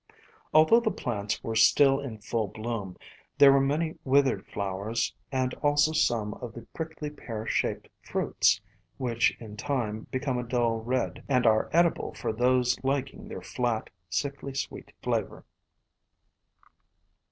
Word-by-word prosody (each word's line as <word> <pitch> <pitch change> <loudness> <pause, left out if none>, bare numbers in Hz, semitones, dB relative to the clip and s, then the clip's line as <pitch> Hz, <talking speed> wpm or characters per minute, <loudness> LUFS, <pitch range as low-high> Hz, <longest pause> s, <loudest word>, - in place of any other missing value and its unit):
Although 160 +9 +6
the 230 - 0
plants 105 - -3
were 115 - -3
still 135 +4 +5
in 130 -6 -6
full 110 +1 -2
bloom, 110 -3 -5 0.4
there 140 -1 +9
were 135 - +4
many 155 +4 0
withered 135 0 +2
flowers 100 +4 -2 0.2
and 130 -1 0
also 145 +1 +3
some 115 -9 +1
of 120 -2 -8
the 120 - -8
prickly 160 -2 -5
pear 115 -7 -6
shaped - - -1
fruits, - - +1 0.4
which 120 -3 +1
in 105 -2 -10
time 110 -4 -2
become 130 -1 -1
a - - -2
dull 120 -1 +1
red, 125 +3 -2
and 125 -3 +3
are 110 -1 +3
edible 170 +1 +2
for - - -2
those 125 +2 +2
liking 135 +10 -2
their 225 - -7
flat, 120 -3 -2 0.2
sickly 140 -1 -3
sweet - - -5
flavor. - - -2
125 Hz, 140 wpm, -28 LUFS, 115-140 Hz, 0.4 s, there